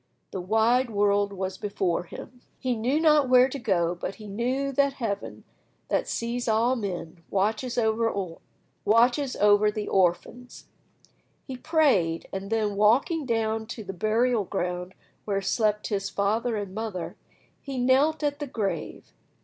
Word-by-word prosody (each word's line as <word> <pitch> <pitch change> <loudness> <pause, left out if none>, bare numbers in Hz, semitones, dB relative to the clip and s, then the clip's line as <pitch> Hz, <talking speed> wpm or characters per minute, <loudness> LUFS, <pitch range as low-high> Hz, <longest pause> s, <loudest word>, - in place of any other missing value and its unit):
The 190 - -4
wide 225 +6 +2
world 205 -1 +2
was 190 -1 -4
before 190 -4 -1
him. 245 +7 -11 0.2
He 255 -2 -1
knew 250 +7 0
not 300 -4 +4
where 255 0 +6
to 275 +1 -6
go, 180 -8 +1
but 180 +2 -5
he 215 - -12
knew 250 +7 -1
that 280 +1 +2
Heaven, 225 -7 -4 0.5
that - - 0
sees 240 +1 -3
all 230 +3 +2
men, 175 -6 -5
watches 220 +6 -1
over 225 0 +2 0.8
the 215 -3 +3
orphans. 195 +7 -1 0.8
He 265 - -6
prayed, 255 - +1
and 195 +1 -5
then 215 -2 0
walking 260 - +3
down 220 -1 -1
to 230 -1 -7
the 195 -1 -6
burial 220 +3 +1
ground 180 +1 -3 0.3
where 200 -2 0
slept 210 +2 0
his 195 -2 -2
father 220 +4 0
and 200 -3 -4
mother, 210 -4 -5 0.5
he 275 -2 -6
knelt 270 +6 +2
at 290 0 -1
the 290 - -4
grave. 210 -6 -4
220 Hz, 140 wpm, -26 LUFS, 200-250 Hz, 0.8 s, where